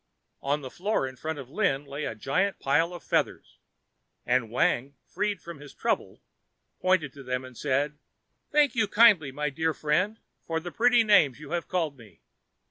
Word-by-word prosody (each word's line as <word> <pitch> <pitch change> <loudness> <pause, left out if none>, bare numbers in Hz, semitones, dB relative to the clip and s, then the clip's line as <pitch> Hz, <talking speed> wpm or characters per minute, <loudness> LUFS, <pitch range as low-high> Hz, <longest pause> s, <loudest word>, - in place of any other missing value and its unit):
On 145 +2 0
the 130 -2 -8
floor 195 -7 -1
in 130 - -9
front 160 +4 -4
of 135 -2 -9
Lin 150 -7 0
lay 140 +2 -5
a - - -4
great 180 - 0
pile 165 +5 +1
of 175 -3 -9
feathers, - - -1 0.7
and 125 -2 +1
Wang 125 +3 +1
freed 205 -1 -2
from 170 -4 -9
his 145 -1 -12
trouble, - - -2 0.6
pointed 185 -7 +1
to 140 - -11
them 125 0 -3
and 130 -1 -12
said, 145 +3 -1 0.5
"Thank 295 -1 +4
you 225 -4 +1
kindly, 205 -12 +5
my 150 +2 -2
dear 160 +2 -1
friend, 180 +9 0 0.2
for 165 -1 -2
the 175 +2 -7
pretty 240 +2 +4
names 160 - +4
you 150 -1 -10
have 175 -1 -2
called 160 -7 -2
me. 105 -8 -17
150 Hz, 180 wpm, -27 LUFS, 135-185 Hz, 0.7 s, kindly